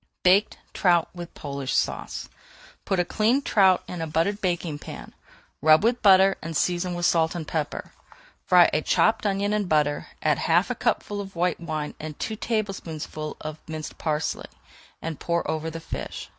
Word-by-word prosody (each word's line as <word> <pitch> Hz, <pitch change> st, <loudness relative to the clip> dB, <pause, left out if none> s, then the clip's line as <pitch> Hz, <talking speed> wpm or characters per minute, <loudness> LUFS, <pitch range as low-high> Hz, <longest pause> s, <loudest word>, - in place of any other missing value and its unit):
BAKED 190 Hz, +3 st, +4 dB, 0.2 s
TROUT 175 Hz, -3 st, +3 dB
WITH 175 Hz, -1 st, -9 dB
POLISH 140 Hz, -3 st, -4 dB
SAUCE -, -, -2 dB, 0.6 s
Put 195 Hz, -, 0 dB
a 175 Hz, -, +2 dB
cleaned 235 Hz, +9 st, +1 dB
trout 190 Hz, -3 st, +4 dB
into 170 Hz, -2 st, -4 dB
a -, -, -7 dB
buttered 165 Hz, +7 st, 0 dB
baking 175 Hz, -5 st, -1 dB
pan, -, -, -9 dB
[Page -, -, -28 dB
420] 150 Hz, -, -5 dB
rub 155 Hz, +4 st, +7 dB
with 235 Hz, +2 st, +2 dB
butter, 195 Hz, -1 st, +6 dB
and 165 Hz, -1 st, -3 dB
season 175 Hz, +1 st, 0 dB
with 175 Hz, 0 st, -1 dB
salt 165 Hz, 0 st, +2 dB
and 160 Hz, -3 st, -5 dB
pepper. 155 Hz, -3 st, -3 dB, 0.5 s
Fry 180 Hz, -2 st, +6 dB
a 150 Hz, -, +2 dB
chopped 220 Hz, +6 st, +2 dB
onion 200 Hz, +1 st, 0 dB
in 210 Hz, -1 st, +1 dB
butter, 150 Hz, -3 st, +1 dB, 0.2 s
add 150 Hz, -3 st, +2 dB
half 175 Hz, +8 st, +2 dB
a -, -, +1 dB
cupful 205 Hz, -3 st, -1 dB
of 195 Hz, -2 st, -9 dB
white 175 Hz, 0 st, 0 dB
wine 155 Hz, -3 st, -4 dB
and 155 Hz, -1 st, -7 dB
two 220 Hz, -, -3 dB
tablespoonfuls 185 Hz, -9 st, -4 dB
of 155 Hz, 0 st, -6 dB
minced 155 Hz, -1 st, -6 dB
parsley, 155 Hz, -1 st, -2 dB, 0.6 s
and 160 Hz, -2 st, -4 dB
pour 170 Hz, 0 st, -1 dB
over 160 Hz, 0 st, -2 dB
the 165 Hz, +1 st, -6 dB
fish. -, -, -6 dB
175 Hz, 180 wpm, -25 LUFS, 155-195 Hz, 0.6 s, rub